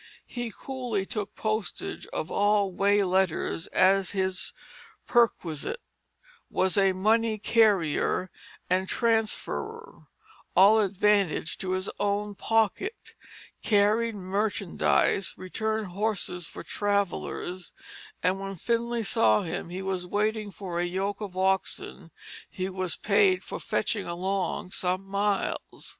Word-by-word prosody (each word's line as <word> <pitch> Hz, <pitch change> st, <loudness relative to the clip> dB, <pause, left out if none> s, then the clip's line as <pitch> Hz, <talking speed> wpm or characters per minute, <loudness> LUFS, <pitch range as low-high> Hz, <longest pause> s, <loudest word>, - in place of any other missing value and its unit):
He 240 Hz, -2 st, -5 dB
coolly 245 Hz, -6 st, -3 dB
took 210 Hz, -2 st, -4 dB
postage 215 Hz, -2 st, -3 dB
of 160 Hz, -, -4 dB
all 205 Hz, -1 st, +2 dB
way 200 Hz, +2 st, +3 dB
letters 185 Hz, -3 st, 0 dB
as 195 Hz, +1 st, +3 dB
his 190 Hz, -1 st, 0 dB, 0.5 s
perquisite; 230 Hz, -, +1 dB, 0.7 s
was 185 Hz, -1 st, +1 dB
a 195 Hz, -1 st, +4 dB
money 220 Hz, +3 st, +2 dB
carrier 200 Hz, -5 st, +2 dB, 0.4 s
and 185 Hz, +1 st, +1 dB
transferrer, 255 Hz, -, -1 dB, 0.5 s
all 200 Hz, +4 st, +7 dB
advantage 200 Hz, -4 st, +1 dB
to 185 Hz, -1 st, -2 dB
his 185 Hz, +1 st, -1 dB
own 205 Hz, 0 st, 0 dB
pocket; 225 Hz, -, 0 dB, 0.5 s
carried 215 Hz, +2 st, +3 dB
merchandise; 195 Hz, 0 st, 0 dB
returned 220 Hz, +2 st, -2 dB
horses 190 Hz, -3 st, -1 dB
for -, -, -9 dB
travellers; 200 Hz, -3 st, -2 dB, 0.5 s
and 185 Hz, +2 st, +2 dB
when 195 Hz, 0 st, -5 dB
Finlay 235 Hz, +4 st, -1 dB
saw 110 Hz, -, +3 dB
him 170 Hz, -, -4 dB
he 185 Hz, +2 st, -5 dB
was 185 Hz, -2 st, -2 dB
waiting 215 Hz, +2 st, 0 dB
for 180 Hz, -2 st, -5 dB
a -, -, +1 dB
yoke 190 Hz, +4 st, -2 dB
of 190 Hz, -3 st, -6 dB
oxen 190 Hz, -2 st, -1 dB, 0.4 s
he 185 Hz, 0 st, -3 dB
was 185 Hz, -2 st, -3 dB
paid 375 Hz, -3 st, +3 dB
for -, -, -6 dB
fetching 205 Hz, -3 st, -1 dB
along 185 Hz, +1 st, -2 dB
some 185 Hz, +1 st, -1 dB
miles. 200 Hz, +1 st, -2 dB
195 Hz, 115 wpm, -27 LUFS, 185-215 Hz, 0.7 s, all